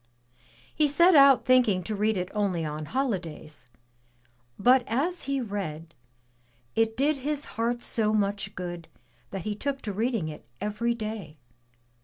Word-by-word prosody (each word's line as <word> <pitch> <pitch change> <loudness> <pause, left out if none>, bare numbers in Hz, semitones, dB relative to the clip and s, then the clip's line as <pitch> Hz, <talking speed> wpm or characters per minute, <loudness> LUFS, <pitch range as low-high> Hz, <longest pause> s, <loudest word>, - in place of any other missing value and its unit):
He 305 - +3
set 340 +6 +5
out 275 -3 +7
thinking 240 -8 +4
to 215 +4 -3
read 210 +1 +1
it 180 0 -3
only 195 -6 0
on 150 0 -4
holidays; 165 - -4 0.9
but 250 +4 +5
as 315 +10 -1
he 275 0 -1
read, 170 -8 -5 0.8
it 225 0 +1
did 285 +3 +2
his 290 +2 -2
heart 235 +2 -1
so 215 -2 +1
much 200 -1 -1
good 175 -2 -6 0.4
that 195 -3 -5
he 210 - -2
took 275 +6 -3
to 205 - -3
reading 225 -4 -1
it 155 -1 -8 0.2
every 230 +3 -1
day. 215 -8 -6
215 Hz, 145 wpm, -27 LUFS, 185-255 Hz, 0.9 s, out